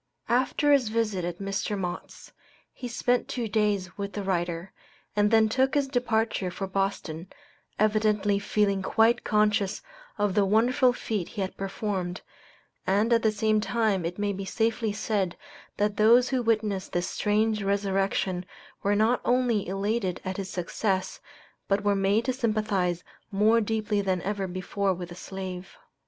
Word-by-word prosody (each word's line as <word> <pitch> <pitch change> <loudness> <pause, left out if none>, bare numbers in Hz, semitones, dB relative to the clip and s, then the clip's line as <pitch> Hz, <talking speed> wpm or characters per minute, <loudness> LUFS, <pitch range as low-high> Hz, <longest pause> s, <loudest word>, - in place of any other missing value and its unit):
After 260 +4 +3
his 260 -6 +3
visit 215 -5 0
at 175 -1 -4
Mr. 195 +2 -2
Mott's, 180 -2 -6 0.4
he 250 - -6
spent 245 +1 0
two 240 -3 -3
days 205 -4 0
with 200 0 -4
the 205 - -3
writer, 175 -1 -2 0.4
and 210 0 +3
then 220 0 +5
took 265 +5 +1
his 285 -1 +2
departure 230 -6 0
for 195 +2 -4
Boston, 190 -3 -2 0.5
evidently 210 -1 +2
feeling 200 -1 +1
quite 225 +4 +3
conscious 210 -2 +1 0.3
of 205 -2 +1
the 205 - +3
wonderful 240 +5 +3
feat 215 -6 -3
he 205 - -5
had 190 - -3
performed, 195 -2 -3 0.7
and 210 +5 +3
at 230 - +4
the 220 - +3
same 215 0 +1
time 220 -5 +1
it 170 +2 -3
may 205 0 0
be 195 +1 -5
safely 225 +2 0
said 205 -3 -1 0.4
that 205 0 0
those 235 +4 +5
who 260 -2 +1
witnessed 215 -4 0
this 175 0 0
strange 215 +1 +1
resurrection 195 -2 0 0.4
were 205 +1 +2
not 220 +4 +2
only 245 -4 +1
elated 195 0 -1
at 185 0 -3
his 195 -2 -4
success, 185 +2 -2 0.5
but 200 +1 +1
were 205 0 +3
made 200 +4 +2
to 260 - +1
sympathize 215 -7 0 0.3
more 215 +3 +4
deeply 215 -1 0
than 190 -2 0
ever 195 0 -2
before 185 +1 -1
with 175 0 -7
the - - -8
slave. 190 0 -7
205 Hz, 155 wpm, -27 LUFS, 190-220 Hz, 0.7 s, then